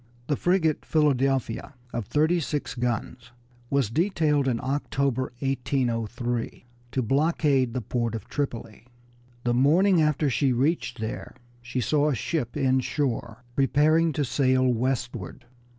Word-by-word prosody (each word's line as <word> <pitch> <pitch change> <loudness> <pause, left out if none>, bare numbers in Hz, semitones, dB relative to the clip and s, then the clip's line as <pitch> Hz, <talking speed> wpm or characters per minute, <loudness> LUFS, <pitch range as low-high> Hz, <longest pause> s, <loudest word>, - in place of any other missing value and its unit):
The 145 - 0
frigate 170 -1 +1
Philadelphia, 135 -4 +1 0.2
of 115 -4 -3
thirty 160 +4 +2
six 150 -2 -3
guns, 120 0 -3 0.4
was 140 -6 +1
detailed 155 - +1
in 120 -3 +1
October, 135 -2 -1
1803, 120 -3 -2 0.3
to 130 - +1
blockade 135 -1 +2
the 125 - -1
port 115 +1 -1
of 110 - -7
Tripoli. 120 -5 -4 0.6
The 120 - +1
morning 165 +8 +4
after 150 -1 +2
she 135 0 +2
reached 140 +2 0
there 110 0 -5 0.3
she 120 +1 -3
saw 150 +4 +2
a 140 - 0
ship 130 0 -2
inshore 130 -3 -1
preparing 155 +4 +3
to 145 0 0
sail 130 0 +2
westward. 120 -2 -2
135 Hz, 125 wpm, -26 LUFS, 120-150 Hz, 0.6 s, morning